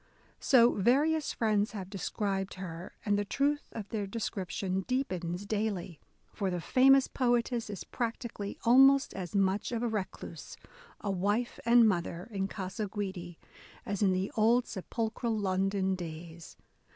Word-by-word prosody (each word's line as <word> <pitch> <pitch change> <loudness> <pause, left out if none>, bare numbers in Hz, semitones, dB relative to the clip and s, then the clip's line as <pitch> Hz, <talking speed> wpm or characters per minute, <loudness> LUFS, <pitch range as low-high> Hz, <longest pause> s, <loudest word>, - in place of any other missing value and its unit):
So 240 -2 +5
various 290 +9 +2
friends 215 -2 +1
have 195 -4 -5
described 195 0 -3
her; 175 -2 -7
and 205 -1 +2
the - - +1
truth 285 +7 0
of 215 -3 -6
their 210 -3 -2
description 190 -3 -3
deepens 185 -8 -2
daily. 205 -6 -2 0.3
For 195 -3 -1
the 180 -1 -2
famous 265 +8 +5
poetess 240 -2 0
is 200 -3 -5
practically 230 -3 -4
almost 270 +3 +6
as 185 +1 -6
much 195 +2 +1
of 235 0 -2
a - - +1
recluse, 210 -4 -5 0.4
a 205 - -1
wife 205 +6 -1
and 235 -1 +7
mother 175 -3 -1
in 195 -2 -1
Gasa 195 +1 -4
Guidi, 185 -4 -5 0.5
as 200 0 -3
in 195 -2 +4
the 185 +1 -1
old 230 +3 +4
sepulchral 225 +3 -3
London 190 -1 0
days. 170 -1 -8
205 Hz, 140 wpm, -31 LUFS, 190-235 Hz, 0.5 s, and